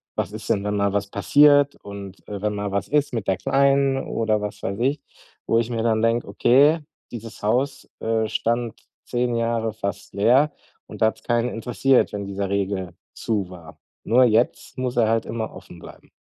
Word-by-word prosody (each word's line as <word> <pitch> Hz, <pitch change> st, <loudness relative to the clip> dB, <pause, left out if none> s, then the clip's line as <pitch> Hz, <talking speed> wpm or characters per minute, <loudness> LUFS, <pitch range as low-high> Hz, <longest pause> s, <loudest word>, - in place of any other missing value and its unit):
Was -, -, -2 dB
ist -, -, -8 dB
denn, 100 Hz, -, +1 dB
wenn 105 Hz, 0 st, -1 dB
mal 100 Hz, -1 st, +1 dB
was 100 Hz, 0 st, 0 dB
passiert 145 Hz, +7 st, +4 dB
und, 100 Hz, -1 st, -10 dB
äh, 100 Hz, -2 st, -6 dB
wenn 105 Hz, 0 st, -1 dB
mal 100 Hz, -1 st, -3 dB
was 100 Hz, 0 st, -1 dB
ist 145 Hz, -1 st, +1 dB
mit 115 Hz, -4 st, -3 dB
der 95 Hz, -, +1 dB
Kleinen“ 140 Hz, 0 st, +2 dB
oder 110 Hz, -5 st, -1 dB
was 105 Hz, 0 st, -6 dB
weiß 100 Hz, +1 st, -3 dB
ich. 135 Hz, +5 st, +1 dB, 0.5 s
Wo 115 Hz, -, +2 dB
ich 115 Hz, 0 st, -1 dB
mir 115 Hz, -2 st, -2 dB
dann 110 Hz, -1 st, +2 dB
denke: 115 Hz, +1 st, +1 dB
„Okay, 135 Hz, +10 st, +4 dB, 0.3 s
dieses 115 Hz, -2 st, -9 dB
Haus, 130 Hz, +6 st, 0 dB
äh, 110 Hz, -1 st, 0 dB
stand 115 Hz, +1 st, -1 dB, 0.3 s
10 120 Hz, 0 st, -1 dB
Jahre 115 Hz, -1 st, -1 dB
fast 100 Hz, -3 st, -5 dB
leer 125 Hz, +9 st, +4 dB, 0.4 s
und -, -, -11 dB
da -, -, +6 dB
hat's 110 Hz, -, -3 dB
keinen 120 Hz, 0 st, +1 dB
interessiert, 125 Hz, +3 st, +1 dB
wenn 100 Hz, -1 st, -4 dB
dieser 100 Hz, 0 st, -3 dB
Regel 95 Hz, -3 st, -2 dB, 0.2 s
zu 105 Hz, -5 st, -2 dB
war. 85 Hz, -3 st, -12 dB, 0.3 s
Nur 125 Hz, +3 st, +4 dB
jetzt 120 Hz, +3 st, +1 dB
muss 130 Hz, -1 st, -2 dB
er 115 Hz, -2 st, +4 dB
halt 115 Hz, 0 st, +1 dB
immer 110 Hz, -1 st, -4 dB
offen 95 Hz, -2 st, -12 dB
bleiben.“ -, -, -14 dB
115 Hz, 190 wpm, -23 LUFS, 100-125 Hz, 0.5 s, da